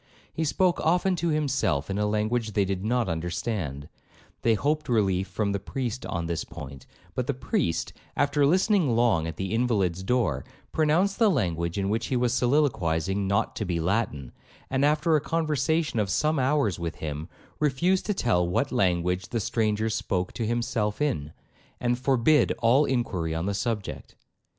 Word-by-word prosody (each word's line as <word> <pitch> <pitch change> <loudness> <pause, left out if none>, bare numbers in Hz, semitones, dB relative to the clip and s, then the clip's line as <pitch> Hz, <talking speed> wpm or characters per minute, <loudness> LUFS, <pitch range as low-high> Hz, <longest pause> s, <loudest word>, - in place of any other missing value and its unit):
He 160 - -1
spoke 180 +4 +2
often 180 +3 +2
to 170 - -1
himself 130 - 0
in 100 +1 -2
a 105 - +1
language 110 +1 0
they 100 -1 +2
did 95 -1 -3
not 120 +1 +1
understand; 85 - -3 0.5
they 115 -1 +3
hoped 150 +5 -1
relief 95 -5 +2
from 105 -2 -1
the 100 - -1
priest 125 +4 -4
on 85 -2 -3
this 85 -1 -2
point, 65 -1 -10 0.3
but - - -2
the - - 0
priest, 80 -1 -1 0.2
after 145 0 +2
listening 180 - +3
long 115 -9 +2
at 80 - -5
the 95 +1 -3
invalid's 105 -7 +1
door, 95 - 0 0.3
pronounced 170 +7 +2
the 225 -2 +5
language 85 - -1
in 100 -1 0
which 110 +3 -1
he 130 - -1
was 120 -1 +1
soliloquizing 100 - +1
not 100 +1 0
to - - -1
be 90 -4 -1
Latin, 80 - -1 0.4
and, 135 +1 +1
after 150 +2 +3
a 150 - +2
conversation 155 -3 0
of 105 -2 0
some 155 - +1
hours 130 - +1
with 85 -2 -3
him, 75 +2 -5 0.3
refused 155 +7 +1
to 210 - 0
tell 90 - +1
what 90 - 0
language 90 -1 +1
the 115 - -1
stranger 110 0 0
spoke 95 -4 -2
to 115 - -2
himself 115 -3 -1
in, 75 - -1 0.5
and 120 0 0
forbid 130 +2 +3
all 125 +6 +4
inquiry 95 -11 -1
on 80 +2 -2
the 100 - -1
subject. 100 - -4
110 Hz, 170 wpm, -26 LUFS, 90-140 Hz, 0.5 s, the